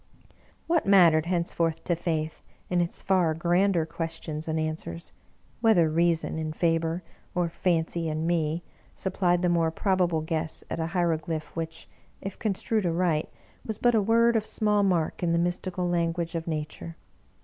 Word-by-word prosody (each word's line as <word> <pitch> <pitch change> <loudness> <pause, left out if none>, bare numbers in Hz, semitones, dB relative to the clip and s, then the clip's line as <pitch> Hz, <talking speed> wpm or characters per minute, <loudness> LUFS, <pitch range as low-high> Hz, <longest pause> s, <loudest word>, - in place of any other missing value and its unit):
What 335 -7 +1
mattered 170 -5 +6
henceforth 170 -2 0
to 175 - 0
Faith, 160 -2 -2 0.3
in 180 -1 +3
its 170 - -3
far 180 -5 +2
grander 175 +1 +2
questions 160 -1 -5
and 160 0 0
answers, 155 - -4 0.5
whether 185 -9 +4
Reason, 165 0 +1
in 155 -1 -3
Faber, 165 +1 0 0.3
or 175 -1 +1
Fancy, 165 -1 0
in 155 +1 -2
me, 165 -1 0 0.3
supplied 180 -2 0
the - - +3
more 170 -2 +2
probable 175 -2 +1
guess 160 0 -3
at - - -2
a 160 - -1
hiero 170 -3 +2
glyph 160 -1 -5
which, 165 -1 -5 0.3
if 195 0 -7
construed 215 0 0
aright, 170 -2 +1 0.3
was 220 -2 -4
but 240 +1 +3
a 220 - +4
word 230 +3 +4
of 220 - +2
small 210 -1 +1
mark 180 -5 +1
in 170 -2 +1
the - - +3
mystical 175 +1 -1
language 170 -1 0
of 165 -1 -4
Nature 155 +1 -4
170 Hz, 160 wpm, -27 LUFS, 160-185 Hz, 0.5 s, mattered